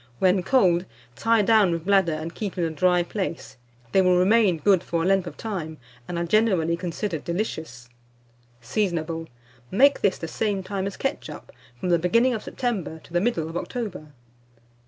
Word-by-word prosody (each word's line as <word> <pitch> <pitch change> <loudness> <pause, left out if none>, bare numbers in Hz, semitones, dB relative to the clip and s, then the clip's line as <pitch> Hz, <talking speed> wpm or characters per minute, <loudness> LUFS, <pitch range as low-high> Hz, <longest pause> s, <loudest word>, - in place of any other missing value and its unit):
When 185 +3 +3
cold, 180 -5 +3 0.3
tie 225 - +2
down 215 -2 +4
with 165 0 -3
bladder 195 -3 +3
and 160 +2 -5
keep 205 -4 -5
in 175 - 0
a 165 - -1
dry 180 +3 +2
place; 180 -5 -5 0.3
they 190 - +4
will 180 -1 +4
remain 195 -1 +4
good 190 +2 +3
for 170 -2 -2
a - - -1
length 190 -1 +2
of - - -8
time, 170 -8 -5 0.3
and 175 - -4
are 170 - -1
generally 180 -4 +2
considered 170 0 -4
delicious. 160 - -4 0.7
Seasonable. 165 - -2 0.4
Make 275 +8 +4
this 195 -2 +2
the 165 - -6
same 200 +2 -2
time 195 0 -3
as 200 - -6
ketchup, 155 - -5 0.3
from 180 - -2
the 170 -1 +3
beginning 230 +9 +3
of 220 - -3
September 215 - -3
to - - -17
the 175 - +2
middle 200 -8 0
of 165 - -8
October. 205 -6 -5
180 Hz, 180 wpm, -24 LUFS, 165-210 Hz, 0.7 s, down